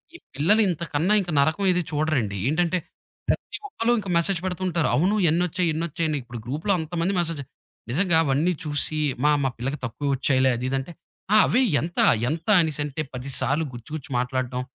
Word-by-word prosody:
ఈ - - -8 0.2
పిల్లలింతకన్నా 170 0 +2
ఇంక 180 - -7
నరకం 160 +7 +2
ఏది 180 0 +1
చూడరండి. 145 -10 0
ఏంటంటే, 170 +4 +1 0.5
ప్రతి - - -2
ఒక్కళ్ళు 240 - 0
ఇంక 200 - -7
మెసేజ్ 170 +2 +1
పెడుతుంటారు. 180 -3 -1
అవును. 185 +7 +2
ఎన్నొచ్చాయి, 175 +1 +1
ఎన్ని 160 +2 -2
వచ్చాయని. 160 -1 -2
ఇప్పుడు 120 -1 -8
గ్రూప్‌లో 155 - -1
అంతమంది 165 +4 -2
మెసేజ్ 165 -4 -1 0.5
నిజంగా 170 +4 +2
అవన్నీ 150 +5 +1
చూసి 155 0 0 0.2
మా 150 - +5
మా 135 - +2
పిల్లకు 135 +5 -3
తక్కువ 130 +4 -4
వచ్చాయిలే 130 0 +2
అది 125 - -4
ఇదంటే 135 +4 -3 0.4
ఆ! - - +7
అవి 250 - +2 0.2
ఎంత, 170 +2 -4 0.3
ఎంత, 165 +2 -4
అనేసంటే 150 -2 -2
10 125 +2 -6
సార్లు 150 +4 0
గుచ్చి 120 -1 -10
గుచ్చి 150 - -8
మాట్లాడటం, 125 0 -2
155 Hz, 165 wpm, -24 LUFS, 135-175 Hz, 0.5 s, ఆ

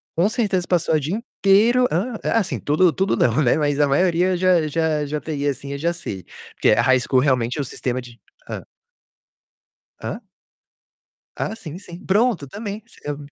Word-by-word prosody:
com 170 +4 +3
certeza 200 -6 0
passar 170 -3 +2
o - - +3
dia 150 +7 -2
inteiro 230 +2 +3
hã? 215 +9 -1
Eh, - - -1
assim, 220 -5 0
tudo 165 +4 +3
tudo 190 -4 0
não, 120 +4 +2
né, 125 -1 +3
mas 145 -2 0
a 145 - +4
maioria 180 +5 +2
já 175 -3 +3
já 155 -1 0
já 150 +1 -3
teria 145 -2 -1
assim 140 +1 -8
eu - - -4
já 170 +4 0
sei. 100 - -7 0.3
Porque - - +3
a 105 - +4
high 130 +1 +4
school 130 +1 +2
realmente 130 -2 +1
é - - 0
o - - -1
sistema 125 0 -3
de 120 -1 -14 0.3
Hã. - - -6 1.3
Hã? - - -6 1.2
Ah, 220 - -3
sim, 170 -5 -8
sim. 175 -3 -11
Pronto, 205 - +2
também, 205 +6 -6
você 230 - -20
eu 145 - -4
160 Hz, 190 wpm, -22 LUFS, 140-190 Hz, 1.3 s, a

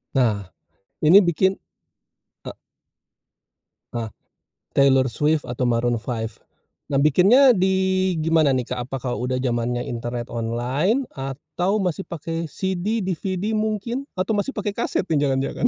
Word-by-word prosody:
Nah, 110 -6 +2 0.6
ini 165 +6 +8
bikin, 190 +3 +2 0.9
eee - - -7 1.4
Eee, 115 -1 -3 0.7
Taylor 135 -1 +4
Swift 150 +2 +1
atau 125 +1 -2
Maroon 120 0 +1
5. 115 -2 -5 0.5
Nah, 140 - -1
bikinnya 190 - +6
di 190 -1 +1
gimana 160 -2 +3
nih, 125 -2 -1
Kak? 125 -1 -4
Apa 135 - -4
kalau 125 -1 -2
udah 130 - -1
zamannya 120 -1 -1
internet, 120 0 -5
online 125 - 0
atau 145 +9 -3
masih 180 0 -1
pakai 165 -1 -4
CD, 190 +5 -2
DVD 185 +3 -2
mungkin? 220 +5 -2
Atau 185 +4 0
masih 210 +6 -1
pakai 205 -1 -2
kaset - - -1
jangan-jangan? 145 - +1
155 Hz, 125 wpm, -23 LUFS, 125-190 Hz, 1.4 s, ini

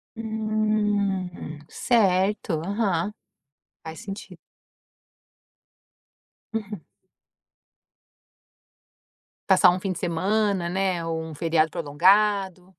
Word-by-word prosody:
Hum. 210 -6 -1
Certo, 195 -6 +1
aham. 200 -2 0 0.7
Faz 160 0 -8
senti 195 0 -8 2.2
Uhum. 210 -6 -5 2.7
Passar 180 - +6
um 180 - -2
fim 195 0 -3
de 175 - -5
semana, 190 +1 0
né, 185 -2 -1
ou 165 -1 -2
um 160 -1 -8
feriado 160 0 +2
prolongado. 185 +4 +2
190 Hz, 75 wpm, -25 LUFS, 170-210 Hz, 2.7 s, Passar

